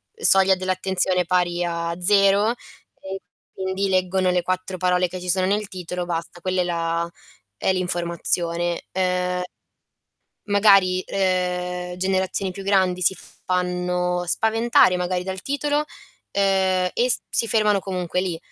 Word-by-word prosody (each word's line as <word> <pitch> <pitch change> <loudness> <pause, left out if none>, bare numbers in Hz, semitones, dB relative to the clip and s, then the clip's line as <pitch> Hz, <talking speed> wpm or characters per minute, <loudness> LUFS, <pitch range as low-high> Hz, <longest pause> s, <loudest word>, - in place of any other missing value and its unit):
Soglia 195 - +5
dell'attenzione 185 0 0
pari 175 0 +1
a 170 -1 -2
0, 200 +2 +4 0.5
e 190 0 -6 0.3
quindi 190 +1 -2
leggono 185 0 +1
le 180 0 +1
4 185 +1 -3
parole 180 0 +2
che 180 +1 -7
ci 180 - -6
sono 185 +1 +2
nel 205 +2 0
titolo 180 -1 -5
basta 170 0 -5
quella 185 +1 -1
è - - +1
la 170 -1 -1 0.5
è 190 - +1
l'informazione. 175 -1 -1
Ehm, 180 -1 0 1.0
magari 195 -3 +4
ehm, 180 -1 -1
generazioni 190 +1 -1
più 195 - -8
grandi 190 -2 +2
si 185 +2 +2 0.3
fanno 180 -1 -1
spaventare 225 0 +3
magari 180 0 -1
dal 190 -1 -5
titolo, 290 +1 -1
uhm, 300 - 0 1.1
e 245 +1 +2 0.2
si 230 - +1
fermano 210 -2 +3
comunque 180 -2 -2
lì. 175 -3 -3
185 Hz, 130 wpm, -22 LUFS, 180-190 Hz, 1.1 s, Soglia